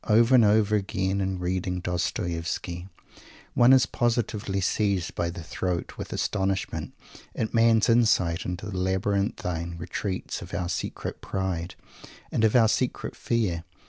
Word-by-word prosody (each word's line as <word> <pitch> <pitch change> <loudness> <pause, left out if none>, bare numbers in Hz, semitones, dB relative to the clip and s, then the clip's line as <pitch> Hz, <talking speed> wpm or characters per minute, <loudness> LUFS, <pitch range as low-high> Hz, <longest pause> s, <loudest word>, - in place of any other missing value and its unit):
Over 115 +4 +5
and 125 -3 +7
over 105 0 +4
again, 100 -2 -1
in 95 0 -1
reading 90 0 -2
Dostoievsky, 85 0 -3 0.7
one 120 +1 +6
is 130 -1 +6
positively 115 -5 -1
seized 95 -2 0
by 85 - -1
the 85 -1 -7
throat 90 +1 -3
with - - -7
astonishment 95 -2 -1 0.4
at 110 - -2
the - - -5
man's 115 0 +5
insight 110 -8 +3
into 90 +3 -4
the 100 -3 -5
labyrinthian 95 -3 -1
retreats 90 +3 -4
of - - -7
our 90 -1 -2
secret 90 - -4
pride 90 -2 -3 0.6
and - - 0
of 110 +1 +4
our 115 -3 +6
secret 125 +3 -1
fear. 100 -8 -1
95 Hz, 145 wpm, -26 LUFS, 90-110 Hz, 0.7 s, and